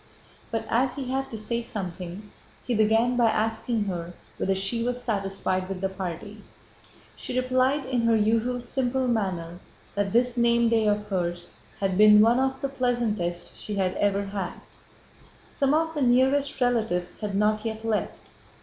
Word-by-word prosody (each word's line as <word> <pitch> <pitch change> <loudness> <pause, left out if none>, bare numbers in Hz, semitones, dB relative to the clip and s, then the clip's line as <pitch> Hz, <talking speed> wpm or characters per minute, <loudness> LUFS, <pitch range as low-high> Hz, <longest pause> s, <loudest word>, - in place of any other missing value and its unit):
But, 225 -1 -2
as 250 +2 +1
he 260 -2 -4
had 270 0 -1
to 225 - -6
say 235 +2 0
something, 190 -2 -6 0.3
he 245 - -1
began 225 +3 +3
by 240 -2 +4
asking 220 +1 0
her 175 -3 -4 0.2
whether 195 - 0
she 195 +5 -1
was 245 +1 -1
satisfied 195 -4 -1
with 190 -1 -4
the 190 0 -1
party. 190 +3 -6 0.7
She 255 - -3
replied 255 +2 +1
in 255 -2 0
her 230 - +4
usual 230 +3 +1
simple 260 +1 -1
manner 180 -7 -2 0.3
that 200 -1 -1
this 245 +2 +2
name 235 0 +3
day 225 -2 +2
of 210 0 +1
hers 175 -2 -2 0.3
had 190 -1 0
been 210 0 +8
one 230 +4 +5
of 265 0 -1
the 275 - 0
pleasantest 235 -9 -1
she 210 - -5
had 190 -2 0
ever 200 0 +1
had. 195 -2 -4 1.0
Some 275 +1 +2
of 320 +1 0
the 295 - -3
nearest 265 +3 +2
relatives 225 -8 0
had 210 -2 -3
not 210 +1 +2
yet 220 -1 -4
left. 220 -2 -2
220 Hz, 165 wpm, -26 LUFS, 195-245 Hz, 1.0 s, been